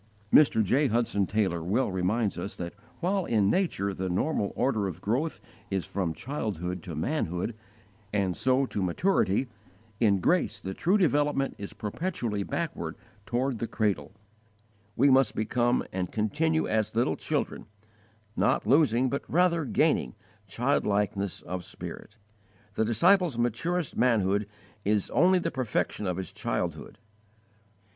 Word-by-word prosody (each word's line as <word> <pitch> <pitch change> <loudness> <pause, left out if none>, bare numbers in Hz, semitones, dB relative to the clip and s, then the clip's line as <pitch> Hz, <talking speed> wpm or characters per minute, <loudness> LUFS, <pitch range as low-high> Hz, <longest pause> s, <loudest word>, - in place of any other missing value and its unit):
Mr. 135 -7 +6
J. 135 +9 +2
Hudson 115 -4 +1
Taylor 95 -5 0
well 105 +6 +1
reminds 95 +2 0
us 100 +5 -5
that 85 -1 -5 0.3
while 190 +2 +1
in 105 -3 +2
nature 130 - 0
the 95 0 -3
normal 100 - 0
order 110 -7 +1
of 95 - -6
growth 130 +10 -1 0.3
is 95 -4 -1
from 90 -5 -2
childhood 95 - -4
to 85 -1 -7
manhood 90 - -1 0.6
and 95 -3 0
so 130 +1 +2
to 105 - -4
maturity, 100 - +1 0.5
in 100 -4 +3
grace 175 - +1
the 95 - -5
true 185 - +2
development 145 -6 +2
is 100 - -6
perpetually 115 - -3
backward 100 - -3 0.3
toward 125 0 -1
the 115 - -2
cradle: 105 -4 -1 0.8
we 140 +3 +5
must 130 -4 +4
become 120 +2 +1
and 90 -1 -2
continue 160 +9 +1
as 110 0 0
little 115 -9 +2
children, - - -3 0.7
not - - +2
losing, 130 0 +4
but 140 +2 -1
rather 170 -1 +2
gaining, 60 - +1 0.3
childlikeness 100 -1 0
of 90 +1 -5
spirit. 105 - -9 0.6
The 110 - +1
disciple's 170 - +3
maturest 135 +8 -1
manhood 105 -4 +2 0.4
is 105 -1 0
only 185 +4 +4
the 180 - -1
perfection 110 -4 -1
of 90 -1 -1
his 95 -3 -5
childhood. - - -3
110 Hz, 135 wpm, -28 LUFS, 95-140 Hz, 0.8 s, Mr